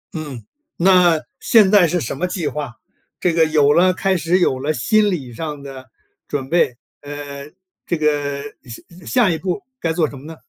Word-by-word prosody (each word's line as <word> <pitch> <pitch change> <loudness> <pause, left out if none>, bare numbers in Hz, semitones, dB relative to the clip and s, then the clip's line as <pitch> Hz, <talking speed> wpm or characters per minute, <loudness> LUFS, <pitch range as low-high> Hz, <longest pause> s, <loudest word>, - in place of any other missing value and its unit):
嗯， 145 -8 -7 0.3
那 180 -2 +5 0.2
现 210 -4 +4
在 200 -5 +6
是 175 +2 0
什 130 - -4
么 180 - -1
计 175 -4 -3
划， 145 -6 -5 0.4
这 180 - +1
个 165 -1 +4
有 150 -2 +3
了 185 +3 +4
开 195 0 +1
始， 175 +1 +1
有 130 -7 +1
了 145 +4 -1
心 210 - +2
理 140 -10 -4
上 150 +2 -6
的 135 -2 -10 0.4
准 135 -2 -4
备 170 -8 +2 0.3
呃， 145 0 -8 0.4
这 170 - 0
个， 145 -2 -1 0.2
下 155 +8 -13 0.2
下 205 - +3
一 160 - -2
步 185 +3 -3 0.2
该 165 - -1
做 160 -1 +1
什 140 - -10
么 135 - -13
呢？ 160 +1 -9
155 Hz, 200 characters per minute, -19 LUFS, 140-180 Hz, 0.4 s, 在